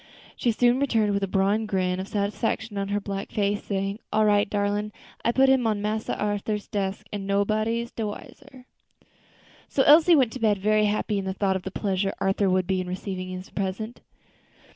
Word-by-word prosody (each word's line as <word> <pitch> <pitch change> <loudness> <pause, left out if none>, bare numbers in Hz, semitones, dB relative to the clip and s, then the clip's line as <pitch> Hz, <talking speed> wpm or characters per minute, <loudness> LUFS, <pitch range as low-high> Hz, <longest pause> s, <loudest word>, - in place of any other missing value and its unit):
She 240 - +1
soon 240 +3 +3
returned 225 -7 +2
with 200 - 0
a 195 - 0
broad 200 +3 +1
grin 185 -2 0
of 190 - -4
satisfaction 210 +1 -2
on 195 - -2
her 205 +1 0
black 200 -1 -5
face, 205 0 0
saying, 195 +1 -2
"All 215 0 +3
right, 205 -1 +3
darlin', 205 +1 -1 0.3
I 235 - +3
put 265 +2 +4
him 265 -3 +3
on 215 -2 0
Massa 215 +1 -2
Arthur's 210 0 -2
desk, 195 -1 -3
an' 200 -1 -4
nobody 215 +4 0
de 225 -2 -2
wiser." 260 +4 -10 1.0
So 270 - +2
Elsie 320 +4 +7
went 260 -6 +3
to 260 - -7
bed 215 -3 +2
very 215 +2 +2
happy 210 0 0
in 195 - -4
the 190 0 -3
thought 195 -1 +1
of 190 - -2
the 190 - -5
pleasure 195 0 -1
Arthur 195 0 +1
would 185 -1 +1
have 190 - +1
in 185 - -3
receiving 185 0 -5
her - - -19
present. 200 +4 -4
205 Hz, 195 wpm, -25 LUFS, 195-220 Hz, 1.0 s, Elsie